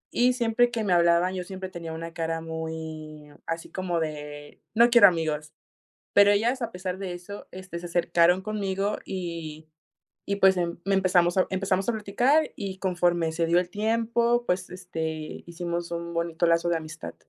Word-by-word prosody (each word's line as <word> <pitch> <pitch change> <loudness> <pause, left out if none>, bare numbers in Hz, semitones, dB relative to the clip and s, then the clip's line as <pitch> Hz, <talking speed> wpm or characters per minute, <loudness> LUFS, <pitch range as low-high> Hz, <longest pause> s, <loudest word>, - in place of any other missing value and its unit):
y 250 +1 +4
siempre 240 0 +2
que 230 -2 -2
me 195 -4 +2
hablaban 170 +1 +4
yo 185 -1 -3
siempre 190 0 -7
tenía 170 -2 -7
una 165 +1 -6
cara 165 0 -2
muy, 160 -2 -6 0.2
así 165 0 -4
como 180 -3 -2
de 150 -2 -6
no 235 +2 +6
quiero 235 - +9
amigos. 155 -3 -1 0.6
Pero 200 0 +7
ellas 235 +6 +1
a 230 - -3
pesar 180 0 -4
de 190 -2 -5
eso, 180 +3 -9
este, 185 -2 -8
se 175 - -9
acercaron 175 +1 +3
conmigo 200 0 -2
y 165 -4 -6 0.6
y 200 - 0
pues 190 -1 +5
em 170 -1 -2
me 195 - +1
empezamos 180 -2 +3 0.2
empezamos 190 +1 0
a - - +1
platicar 240 +9 +2
y 195 -2 -5
conforme 175 -3 +1
se 165 +1 0
dio 170 +2 +4
el 180 0 -3
tiempo, 230 +3 +1
pues, 180 0 -1
este, 160 -4 -5
hicimos 170 0 -4
un 170 0 -4
bonito 170 0 0
lazo 170 +1 +2
de 170 - +2
amistad. 155 -1 -8
175 Hz, 175 wpm, -26 LUFS, 165-195 Hz, 0.6 s, quiero